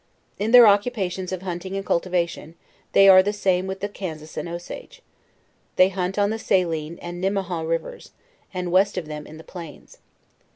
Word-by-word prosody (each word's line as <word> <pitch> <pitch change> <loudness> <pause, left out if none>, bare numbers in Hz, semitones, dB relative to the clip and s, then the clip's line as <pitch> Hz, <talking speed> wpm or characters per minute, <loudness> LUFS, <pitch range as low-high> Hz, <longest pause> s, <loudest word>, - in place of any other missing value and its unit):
In 210 +2 -1
their 245 0 +9
occupations: 200 -3 +1
of 185 -1 -4
hun 175 -2 -3
ting 190 +2 -7
and 195 - -5
cultivation, 170 -2 -1 0.4
they 195 - +7
are 185 -1 +9
the 205 +2 -1
same 190 -3 0
with 190 0 -5
the 205 - -1
Kansas 160 -6 -8
and 175 - -4
Osage. 175 - -9 0.7
They 185 +1 +5
hunt 185 0 -3
on 205 0 +2
the 225 - -3
Saline 170 -5 0
and 175 +1 -6
Nimmehaw 185 -4 -2
rivers, 165 - -4 0.4
and 180 -2 -4
west 195 +2 +3
of 180 - -2
them 150 -1 -7
in 155 - -11
the 160 - -12
plains. 165 -3 -11
185 Hz, 180 wpm, -23 LUFS, 170-195 Hz, 0.7 s, their